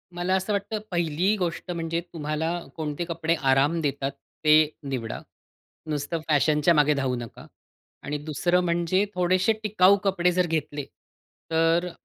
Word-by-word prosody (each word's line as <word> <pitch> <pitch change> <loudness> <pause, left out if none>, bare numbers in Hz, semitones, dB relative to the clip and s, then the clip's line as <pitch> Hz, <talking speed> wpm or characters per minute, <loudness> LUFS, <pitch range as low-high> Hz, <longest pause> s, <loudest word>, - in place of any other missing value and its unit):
मला 175 +2 -1
असं 190 +3 -1
वाटतं 205 +2 -2
पहिली 175 +4 +1
गोष्ट, 175 0 -3
म्हणजे 165 -1 -2
तुम्हाला 155 0 -2 0.3
कोणते 155 +1 -3
कपडे 165 -1 -1 0.2
आराम 140 +5 +3
देतात 140 -2 -1 0.3
ते 150 - +7 0.4
निवडा. 120 -4 -4 0.7
नुसतं 150 +2 -2
फॅशनच्या 150 +2 +3
मागे 150 -1 +4
धावू 135 -3 -1
नका. 120 -1 -8 0.6
आणि 150 +1 -3
दुसरं 175 +4 +1
म्हणजे 175 +3 +1
थोडेशे 185 +4 +2
टिकाऊ 200 -1 +5
कपडे 180 -3 +2
जर 180 0 +2
घेतले, 150 -3 -2 0.7
तर 165 +2 +3
अ, - - -6
165 Hz, 140 wpm, -25 LUFS, 150-180 Hz, 0.7 s, ते